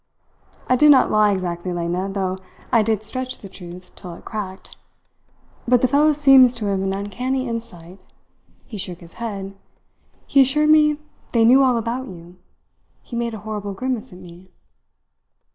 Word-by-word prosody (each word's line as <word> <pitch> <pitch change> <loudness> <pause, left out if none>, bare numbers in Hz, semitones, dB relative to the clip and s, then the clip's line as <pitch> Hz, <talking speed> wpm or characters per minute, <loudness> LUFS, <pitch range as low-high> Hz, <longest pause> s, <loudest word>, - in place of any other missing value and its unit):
I 255 - +3
did 300 +4 +5
not 275 -3 +5
lie 215 -1 +4
exactly, 180 -2 -3
Lena, 175 +2 -2
though 190 -1 -3 0.3
I 230 - +4
did 215 -1 -1
stretch 255 +3 -4
the 200 - -11
truth 180 -1 -12
till 175 -2 -10
it - - -16
cracked; 195 -4 -7 0.9
but 250 0 +3
the - - +5
fellow 290 +4 +3
seems 270 -4 +6
to 225 -3 -5
have 195 -1 -1
an 195 0 -1
uncanny 250 +7 -3
insight. 195 -6 -7 0.7
He 215 -4 -8
shook 180 -2 -4
his 170 -1 -8
head. 195 -4 -5 0.7
He 275 - +4
assured 300 +3 +3
me 300 -1 +4 0.4
they 230 -2 +4
knew 255 +4 +6
all 255 -3 +3
about 235 +3 -3
you. 175 -1 -12 0.7
He 240 - -9
made 235 -1 -2
a - - -8
horrible 205 -2 -5
grimace 255 +1 -3
at 180 - -12
me." 180 0 -14
215 Hz, 165 wpm, -21 LUFS, 185-255 Hz, 0.9 s, seems